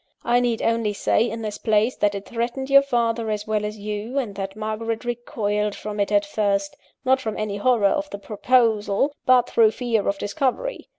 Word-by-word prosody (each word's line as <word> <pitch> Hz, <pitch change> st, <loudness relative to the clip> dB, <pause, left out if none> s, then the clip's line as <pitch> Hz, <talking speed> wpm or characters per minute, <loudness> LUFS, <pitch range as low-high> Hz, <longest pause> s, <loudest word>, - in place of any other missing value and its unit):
I 240 Hz, +1 st, +3 dB
need 240 Hz, -2 st, 0 dB
only 230 Hz, -2 st, +1 dB
say, 225 Hz, +3 st, +1 dB
in 225 Hz, +1 st, -5 dB
this 210 Hz, -1 st, -4 dB
place, 220 Hz, +3 st, +2 dB
that 205 Hz, 0 st, +1 dB
it 200 Hz, -, -6 dB
threatened 240 Hz, +3 st, -3 dB
your 275 Hz, 0 st, +8 dB
father 235 Hz, -4 st, 0 dB
as 210 Hz, -1 st, -2 dB
well 215 Hz, -1 st, -1 dB
as 210 Hz, +1 st, -4 dB
you, 210 Hz, +5 st, -5 dB
and 240 Hz, -7 st, -1 dB
that 195 Hz, 0 st, -5 dB
Margaret 220 Hz, +2 st, -3 dB
recoiled 210 Hz, -4 st, -2 dB
from 210 Hz, 0 st, -6 dB
it 200 Hz, +1 st, 0 dB
at 205 Hz, 0 st, +3 dB
first 200 Hz, -1 st, -1 dB, 0.3 s
not 260 Hz, 0 st, +3 dB
from 220 Hz, -4 st, -4 dB
any 210 Hz, -1 st, -3 dB
horror 235 Hz, -1 st, +2 dB
of 295 Hz, +9 st, +1 dB
the 200 Hz, -, -6 dB
proposal, 220 Hz, +3 st, +1 dB
but 250 Hz, -1 st, +5 dB
through 225 Hz, -2 st, +4 dB
fear 225 Hz, -2 st, -1 dB
of 200 Hz, -, 0 dB
discovery. 260 Hz, -, -2 dB
220 Hz, 195 wpm, -23 LUFS, 205-240 Hz, 0.3 s, your